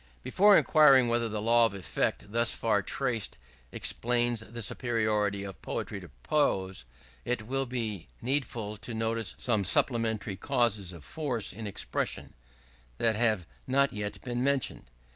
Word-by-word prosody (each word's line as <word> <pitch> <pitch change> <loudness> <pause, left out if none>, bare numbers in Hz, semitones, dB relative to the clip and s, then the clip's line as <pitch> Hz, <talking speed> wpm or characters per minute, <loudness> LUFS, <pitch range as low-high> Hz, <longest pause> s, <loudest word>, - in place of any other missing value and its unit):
Before 205 +1 +6
inquiring 140 -6 +6
whether 115 -1 +1
the 105 -1 -3
law 115 +1 +5
of 100 - -8
effect, 100 +1 -2
thus 115 +1 +2
far 110 -3 +1
traced, 120 +1 -2 0.3
explains 120 -1 +1
the 115 +1 -5
superiority 105 -4 0
of 100 -2 -8
poetry - - -4
to - - -12
prose, 95 - 0 0.4
it 120 -3 -2
will 135 +3 -1
be 110 -7 -4
needful 120 -5 -2
to 115 +3 -7
notice 115 -3 -2
some 110 -5 +1
supplementary 110 +1 0
causes 110 -7 0
of 85 -4 -11
force 130 -9 -3
in 110 +2 -6
expression, 100 - -3 0.6
that 115 - +2
have 110 -5 +1 0.2
not 140 +1 +2
yet 105 -1 -4
been 120 0 -2
mentioned. 140 - -1
115 Hz, 145 wpm, -29 LUFS, 105-125 Hz, 0.6 s, Before